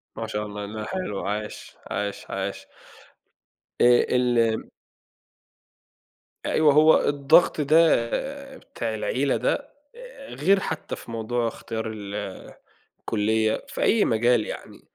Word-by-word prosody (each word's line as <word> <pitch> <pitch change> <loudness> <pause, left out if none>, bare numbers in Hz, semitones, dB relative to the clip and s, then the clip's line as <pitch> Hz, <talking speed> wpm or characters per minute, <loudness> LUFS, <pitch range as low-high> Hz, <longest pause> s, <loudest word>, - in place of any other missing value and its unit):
ما - - -4
شاء 105 0 -3
الله، 105 0 -6
لأ 105 +1 -6
حلو، 185 - -4
عاش، 105 +1 -5 0.2
عاش، 100 0 -3
عاش. - - -4 1.1
آآ، - - +6 0.3
ال 125 - +3 2.2
أيوه، 150 -3 +4
هو 155 +1 +6
الضغط 145 +3 +4
ده 155 -4 +4 0.5
بتاع 115 - -5
العيلة 130 +5 0
ده، - - +1 0.4
آآ، - - -12
غير 195 +8 +3
حتى 160 -4 -4
في 115 - -11
موضوع 115 +1 -1
اختيار 110 0 -5
ال 100 -1 -7 0.8
الكُلّية 110 0 0
في - - -6
أي 220 -1 +4
مجال 120 -1 +2
يعني، - - -8
115 Hz, 115 wpm, -25 LUFS, 110-155 Hz, 2.2 s, آآ